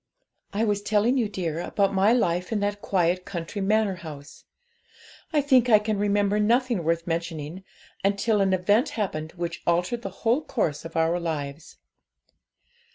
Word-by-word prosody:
'I 210 +3 0
was 205 -2 +1
telling 215 +4 +2
you, 225 -4 0
dear, 170 -5 -3
about 200 +2 0
my 195 +3 +4
life 180 -6 +1
in 220 - 0
that 205 0 -2
quiet 180 -1 +1
country 180 +3 -5
manor 205 -1 +1
house. 150 -4 -10 0.9
I 300 -3 +3
think 260 -4 +4
I 215 - +8
can 210 -1 -2
remember 205 0 +1
nothing 235 -2 +2
worth 165 +1 0
mentioning, 165 0 -4 0.4
until 200 +2 +2
an 195 -1 +2
event 205 - +2
happened 160 -7 -3
which 170 -1 -5
altered 180 +7 +1
the - - -4 0.2
whole 245 +7 +3
course 165 - -2
of 165 - -9
our 165 +2 +2
lives. 150 -3 -5
195 Hz, 160 wpm, -25 LUFS, 170-215 Hz, 0.9 s, I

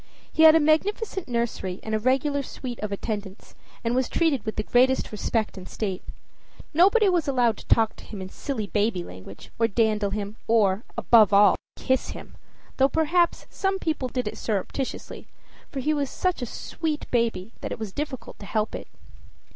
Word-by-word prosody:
He - - +2
had 320 0 +9
a - - +6
magnificent 380 +6 +1
nursery 235 -6 -2
and 220 - -4
a 215 - +2
regular 270 +4 +1
suite 255 -2 -7
of 210 -1 -4
attendants, 200 -1 -5 0.3
and 230 0 0
was 255 0 +1
treated 315 -8 +1
with 220 - -2
the 215 - -1
greatest 255 +4 +3
respect 215 -1 -2
and 185 - -10
state. 195 -4 -3 0.7
Nobody 400 +7 +5
was 350 -5 +2
allowed 245 -4 +2
to - - -12
talk 225 -1 +3
to - - -12
him 210 - -8
in 185 0 -6
silly 235 -1 -4
baby 205 -3 0
language, 95 - -11
or 230 - +4
dandle 215 -2 +1
him, 205 +1 -4
or, 215 -2 +3
above 215 -4 +5
all 205 +1 +7 0.2
to - - -13
kiss 260 0 +1
him, - - -12 0.4
though 270 0 +4
perhaps 335 +3 +2
some 385 -1 0
people 310 -7 -2
did 250 -2 -3
it - - -5
surreptitiously, 225 +5 -3 0.4
for 270 - -4
he 305 +4 +1
was 285 -2 -1
such 365 -6 -1
a 245 - -2
sweet 310 +5 -4
baby 230 -4 0
that - - -5
it - - -3
was 215 -4 -6
difficult 285 -5 -5
to 200 - -9
help 215 -1 -1
it. - - -6
235 Hz, 185 wpm, -25 LUFS, 210-295 Hz, 0.7 s, had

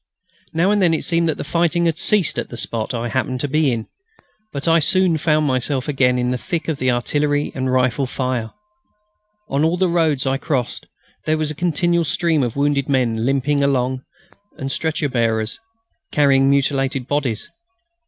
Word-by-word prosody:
Now 170 +5 +2
and 210 -1 +2
then 170 -3 +4
it - - -3
seemed 170 -1 +1
that 155 - -1
the - - -4
fighting 170 +2 +1
had 165 -2 +1
ceased 190 -1 +2
at - - -5
the 120 - -8
spot 115 0 -3
I 120 -1 -3
happened 130 +1 -2
to 145 - -1
be 150 0 +2
in, 115 -2 -3 0.7
but 140 +3 -4
I 165 0 +5
soon 185 +2 +3
found 155 0 +2
myself 130 0 -1
again 130 -3 +2
in 125 0 0
the 125 - -2
thick 165 +3 -3
of 160 -4 -2
the 130 - +1
artillery 145 +4 0
and 130 -1 -2
rifle 130 +1 +1
fire. 125 -3 -2 1.0
On 140 +2 0
all 165 +3 +2
the 185 +1 +2
roads 160 -6 +1
I 135 0 +1
crossed 135 -4 -3 0.4
there 155 0 +1
was 155 -1 -1
a - - -4
continual 170 +1 0
stream 160 0 +1
of 120 -3 -2
wounded 140 0 0
men 120 -4 +1
limping 140 +1 +1
along 130 -2 0 0.6
and 135 0 -4
stretcher 160 0 -1
bearers 115 -3 -1 0.5
carrying 135 -2 +4
mutilated 135 -2 0
bodies. 140 -7 -1
140 Hz, 185 wpm, -20 LUFS, 130-160 Hz, 1.0 s, I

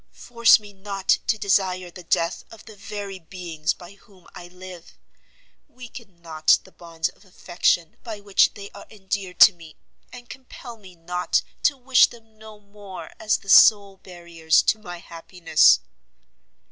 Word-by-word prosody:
force 235 -1 +3
me 205 -1 -15
not 195 0 -8 0.2
to 220 - +1
desire 185 -3 -1
the 180 - -12
death 170 0 -2
of 225 -2 -15
the 220 - -13
very 200 -2 -8
beings 165 -3 -5
by 175 0 -10
whom 195 -3 -24
I 175 - -11
live! 180 -1 -13 0.7
weaken 235 -8 -14
not 155 -2 +2
the - - -19
bonds 165 -1 -5
of - - -23
affection 175 -3 -2
by 220 -4 -8
which 200 -1 +1
they 200 -1 -11
are 200 - -14
endeared 190 -2 -6
to 200 - +9
me, 165 -3 -16 0.4
and 245 -1 -13
compel 255 -2 -12
me 190 -5 -17
not 180 +2 -2 0.2
to 285 - +1
wish 255 0 +4
them 225 -2 -19
no 215 -1 -14
more 200 -5 -12
as 215 -1 0
the 195 - -21
sole 200 -1 +5
barriers 170 -3 -1
to 215 - 0
my 175 -4 -9
happiness!" 165 - +1
190 Hz, 160 wpm, -22 LUFS, 175-215 Hz, 0.7 s, to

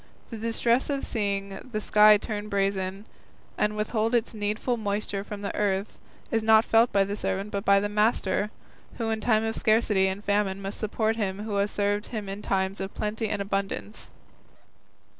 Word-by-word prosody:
The 230 - -6
distress 230 +3 +1
of 280 -1 -1
seeing 200 -2 -2
the 215 - -1
sky 210 0 +6
turn 210 0 -5
brazen, 195 0 -1 0.5
and 210 0 0
withhold 220 +2 0
its 235 0 0
needful 215 +3 -1
moisture 205 -2 -2
from 205 0 -7
the 200 - -3
earth, 200 0 -1 0.3
is 225 - +2
not 220 0 +5
felt 230 +2 +4
by 200 - +4
the 200 +1 -3
servant 195 +1 -2
but 200 -1 -2
by 200 -2 +5
the 205 - -1
master, 210 -1 +1 0.5
who 225 -2 -1
in 220 0 -2
time 220 -1 +2
of 225 0 -2
scarcity 215 -3 +3
and 190 +2 -3
famine 200 -1 0
must 195 0 -6
support 220 +1 0
him 200 -1 -2
who 210 -2 -2
has 200 +1 +1
served 205 +1 -1
him 215 -4 -5
in 195 +1 -5
times 190 0 -1
of 195 0 -5
plenty 215 +1 -2
and 205 -1 -1
abundance." 195 - -4
210 Hz, 180 wpm, -27 LUFS, 200-220 Hz, 0.5 s, sky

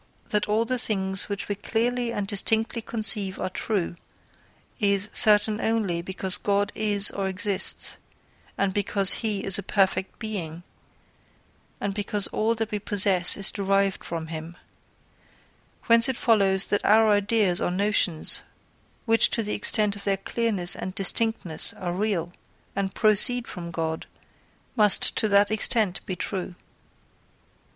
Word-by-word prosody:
that 210 0 -1
all 220 +2 0
the 255 +1 0
things 195 -5 -2
which 200 -1 -5
we 205 - -3
clearly 235 +4 -3
and 205 -3 -4
distinctly 220 +3 +3
conceive 210 -4 +2
are 185 - -4
true, 185 -4 -4 0.8
is 200 0 -1
certain 210 0 +3
only 210 -7 -2
because 190 +1 -3
God 205 0 -1
is 205 -2 +2
or 195 -1 -4
exists 190 +1 -3 0.6
and 195 -1 -1
because 200 -1 +2
he 215 -4 -2
is 195 0 0
a - - -4
Perfect 195 -1 -2
Being, 175 -7 -7 1.2
and 200 - -4
because 205 0 -3
all 225 +2 -1
that 225 -1 -5
we 210 - -3
possess 195 -3 +4
is 200 0 +2
derived 195 -1 -2
from 165 -1 -6
him: 160 +2 -9 1.3
whence 230 +2 +5
it 260 - -3
follows 195 -4 +1
that 205 - -1
our 220 +1 +3
ideas 205 -3 +1
or - - -1
notions, 185 -3 +2 0.6
which 225 -1 +3
to 230 - -2
the 210 - -5
extent 210 -1 0
of 200 - -10
their 195 -1 -1
clearness 195 -3 -2
and 185 0 -8
distinctness 195 -3 +3
are 175 -2 -6
real, 180 -3 -3 0.4
and 195 -1 -4
proceed 230 +3 +4
from 175 -3 -9
God, 160 -1 -5 0.7
must 210 -4 +3
to 215 - +1
that 200 0 +2
extent 215 -3 0
be 185 - -4
true. 185 0 -6
200 Hz, 145 wpm, -23 LUFS, 190-215 Hz, 1.3 s, whence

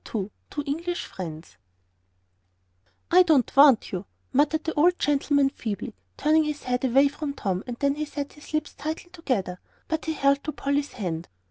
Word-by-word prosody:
II 205 -1 -2 0.2
TWO 290 - -4
ENGLISH 335 +5 -2
FRIENDS 165 -3 -8 1.5
"I 365 +2 +8
don't 310 -10 +3
want 275 -4 +6
you," 185 +1 -4 0.3
muttered 300 +4 +2
the 320 - -2
old 350 +4 +4
gentleman, 285 -1 +2
feebly, 210 -7 -5 0.2
turning 310 +1 +4
his 300 -1 -4
head 250 0 -1
away 265 +2 +5
from 285 0 -4
Tom, 190 -5 -2
and 240 -1 -5
then 280 0 +2
he 305 +1 -3
set 285 -1 -5
his 295 - -14
lips 310 -1 -2
tightly 315 +4 -5
together. 240 - -2 0.3
But 320 -1 -2
he 320 - -1
held 280 -1 +2
to 305 - -3
Polly's 280 +1 -1
hand. 175 -7 -4
280 Hz, 170 wpm, -26 LUFS, 245-310 Hz, 1.5 s, I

